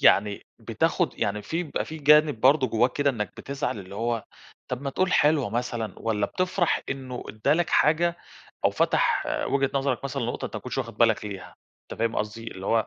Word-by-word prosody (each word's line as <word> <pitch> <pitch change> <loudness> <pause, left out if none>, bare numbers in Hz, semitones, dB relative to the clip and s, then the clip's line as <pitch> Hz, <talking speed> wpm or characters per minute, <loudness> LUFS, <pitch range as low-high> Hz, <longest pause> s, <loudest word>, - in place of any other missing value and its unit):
يعني 100 0 +4
بتاخد - - 0
يعني 105 +1 -1
في 165 +11 -2
بيبقى 155 - -3
في 160 0 -8
جانب 150 -3 +5
برضو 135 +1 +5
جوّاك 120 +3 +2
كده، 145 -1 +2
إنك 105 -5 -4
بتزعل 140 -5 -3
اللي 95 0 -9
هو 115 +1 -1 0.4
طَب 125 +1 -4
ما 140 - -2
تقول 185 +6 0
حلوة 145 -6 +3
مثلًا، 120 -1 -2
والَّا 105 -3 0
بتفرح 180 - 0
إنه 130 -2 -5
ادى 110 +7 +1
لَك 175 +1 +1
حاجة، 170 +3 +3 0.5
أو - - +5
فتح - - +2 0.2
وجهة 135 -1 +1
نظرك 135 -1 0
مثلًا 140 -1 -3
لنقطة 120 +1 -3
أنتَ - - -7
ما - - -5
كنتش 125 +1 -4
واخد 115 -3 -4
بالك 115 -2 +3
ليها، 100 -2 -7 0.4
أنتَ - - -8
فاهم 115 0 0
قصدي؟ 110 +2 -3
اللي 95 +1 -8
هو 115 -1 +2
125 Hz, 195 wpm, -26 LUFS, 110-145 Hz, 0.5 s, جانب